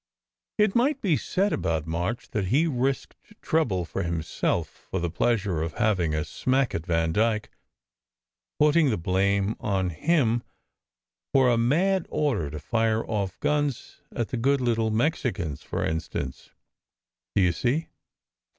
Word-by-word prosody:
It 210 -2 +3
might 270 +4 +2
be 185 - +2
said 195 +7 0
about 80 -2 -1
March 85 +8 -3
that 105 -3 -1
he 135 - +3
risked 135 -3 -1 0.2
trouble 115 - 0
for - - -4
himself, 85 -2 -2
for 95 - -1
the 85 -1 -2
pleasure 100 -4 0
of 80 -1 -3
having 90 -8 +1
a 75 - -1
smack 130 0 0
at 85 - -4
Vandyke; 90 +7 +1 1.1
putting 150 0 +4
the 110 - +1
blame 100 +4 +1
on 95 -3 0
him 120 - +2 0.9
for 130 -2 +6
a - - +4
mad 170 +10 +2
order 120 - 0
to 75 - -6
fire 110 +7 0
off 100 -4 -3
guns 145 -4 -1
at 120 -2 -3
the 125 - -2
good 135 +4 +2
little 115 -3 +1
Mexicans, 110 - -1
for - - -3
in 80 0 0
stance, 70 -4 -6 0.9
do 100 - +4
you 90 - +4
see?" 130 - -1
110 Hz, 145 wpm, -26 LUFS, 90-140 Hz, 1.1 s, for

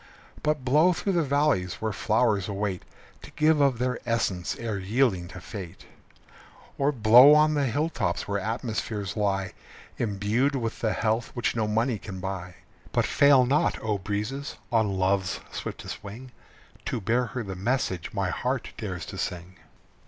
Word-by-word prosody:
But 150 -3 -1
blow 155 +8 +4
through 195 +3 -2
the 170 - +3
valleys 140 - +1
where 110 0 -3
flowers 110 -3 +1
await 100 -2 -2 0.4
To - - -11
give 155 -1 +3
of 135 -4 +3
their 125 +1 -1
essence 105 -7 -1
ere 110 -4 -3
yielding 100 -2 +1
to 95 - -10
fate; 90 -2 -9 0.9
Or 140 +1 +3
blow 125 +4 +8
on 155 0 +4
the 145 -2 +1
hill 145 +7 0
tops 85 - -2
where 100 0 -1
atmospheres 110 -2 -3
lie 95 -3 0 0.5
Imbued 115 +6 0
with 115 -4 -3
the 110 -2 0
health 110 +2 0
which 120 -1 -1
no 110 -2 0
money 115 +1 0
can 95 -2 -8
buy. 90 -1 -5 0.4
But - - +1
fail 140 -3 +5
not, 140 +4 +2
O 105 -2 -1
breezes, 105 +8 -4
on 110 -4 +1
Love's 95 0 +1
swiftest - - -6
wing 120 +6 -9 0.5
To - - -2
bear 115 +5 +1
her 120 +3 -4
the 95 -2 -6
message 95 -4 -1
my - - -1
heart - - -2
dares 90 -6 -4
to - - -8
sing. 90 +1 -5
110 Hz, 160 wpm, -26 LUFS, 95-130 Hz, 0.9 s, blow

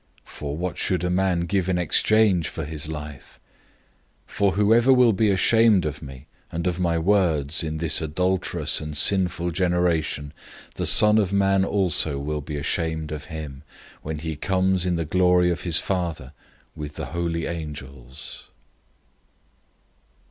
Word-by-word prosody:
008:037 - - -21
For 75 0 -6
what 90 +1 -2
will 90 -2 0
a - - 0
man 95 -1 +1
give 95 +1 -1
in 90 - +1
exchange 95 +1 +2
for 80 - -6
his 75 0 -5
life? 75 -3 -9 0.9
008:038 - - -21
For 100 -1 +2
whoever 110 +6 +4
will 125 -3 +5
be 105 +2 +2
ashamed 105 0 +3
of 75 0 -4
me 70 -2 -11 0.3
and 85 +1 -4
of 90 -1 -1
my 85 -2 0
words 85 -4 +1
in 80 -1 -4
this 80 -1 +1
adulterous 90 +4 0
and 75 -1 -5
sinful 90 -1 +2
generation, 85 -4 -1 0.4
the - - -1
Son 105 0 +5
of 100 -3 0
Man 95 -1 +2
also 90 -7 +1
will 75 +2 -3
be 75 +1 -6
ashamed 80 +1 -2
of 75 -1 -6
him, 75 -5 -8 0.4
when 80 0 -5
he 80 0 -5
comes 95 +2 0
in 90 - 0
the 85 -1 -2
glory 90 +1 +3
of 85 - -3
his 85 -2 +3
Father 85 -10 -3 0.4
with 75 -1 -7
the - - -5
holy 85 -1 -2
angels." 70 -5 -8
85 Hz, 155 wpm, -23 LUFS, 75-95 Hz, 0.9 s, will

